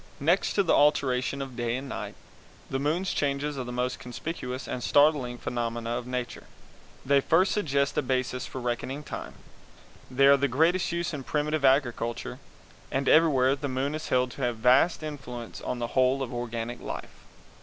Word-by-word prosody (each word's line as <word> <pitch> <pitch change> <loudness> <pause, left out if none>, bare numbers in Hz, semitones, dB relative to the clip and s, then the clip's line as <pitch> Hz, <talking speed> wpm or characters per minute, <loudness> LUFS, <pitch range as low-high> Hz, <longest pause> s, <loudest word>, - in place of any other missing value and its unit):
Next 170 +7 +2
to 200 - +3
the 170 - +2
alteration 140 -2 +2
of 130 -2 -9
day 120 -1 -1
and 135 +1 -6
night, - - -6 0.6
the 135 - 0
moon's 165 +7 0
changes 145 +1 -1
are 130 - -3
the 125 - -6
most 125 +1 -2
conspicuous 125 0 -5
and 125 - -4
startling 145 -4 +3
phenomena 120 -1 -3
of 120 +1 -3
Nature; 125 -1 -4 0.6
they 140 +1 +4
first 180 +7 +3
suggest 140 -8 0
a - - +2
basis 130 -1 -1
for 130 - -6
reckoning 125 +4 -3
time; - - -7 0.7
they 135 +2 +3
are 140 - +8
of 140 0 +4
the 140 - +3
greatest 165 +9 +2
use 170 0 -2
in 140 -3 -5
primitive 150 +1 -1
agriculture; 130 -4 +1 0.5
and 135 0 -1
everywhere 140 -5 +5
the 140 +1 -4
moon 130 +3 -1
is 155 0 -5
held 125 0 +2
to 140 - -9
have 120 -2 0
vast 130 +8 +4
influence 130 -6 -7
on 125 - -3
the 120 -1 -3
whole 130 +1 +3
of 125 - -6
organic 120 0 -4
life. - - -7
135 Hz, 180 wpm, -27 LUFS, 125-145 Hz, 0.7 s, are